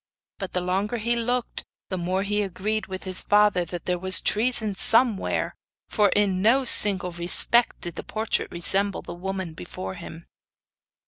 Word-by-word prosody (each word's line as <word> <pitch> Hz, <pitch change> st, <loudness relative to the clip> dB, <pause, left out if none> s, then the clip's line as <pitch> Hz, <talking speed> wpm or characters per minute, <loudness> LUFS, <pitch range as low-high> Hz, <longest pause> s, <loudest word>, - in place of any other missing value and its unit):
But 195 Hz, -2 st, -7 dB
the 180 Hz, -, -1 dB
longer 195 Hz, +6 st, -2 dB
he 235 Hz, +2 st, -1 dB
looked 245 Hz, +1 st, -3 dB, 0.3 s
the 185 Hz, -, -4 dB
more 185 Hz, +3 st, -2 dB
he 205 Hz, +1 st, -2 dB
agreed 205 Hz, +3 st, -4 dB
with 190 Hz, 0 st, -7 dB
his 185 Hz, -1 st, -2 dB
father 205 Hz, -3 st, +2 dB
that 175 Hz, 0 st, -8 dB
there 180 Hz, -1 st, -2 dB
was 185 Hz, +1 st, +3 dB
treason 220 Hz, -1 st, 0 dB
somewhere, 225 Hz, +2 st, +2 dB, 0.3 s
for 210 Hz, -3 st, +1 dB
in 195 Hz, -3 st, 0 dB
no 255 Hz, +6 st, +2 dB
single 200 Hz, -5 st, +6 dB
respect 175 Hz, +7 st, +2 dB
did 175 Hz, -, -6 dB
the -, -, -6 dB
portrait 220 Hz, 0 st, -3 dB
resemble 195 Hz, +3 st, 0 dB
the -, -, -9 dB
woman 190 Hz, -1 st, -6 dB
before 95 Hz, -, -8 dB
him. 165 Hz, +1 st, -11 dB
195 Hz, 165 wpm, -23 LUFS, 180-215 Hz, 0.3 s, single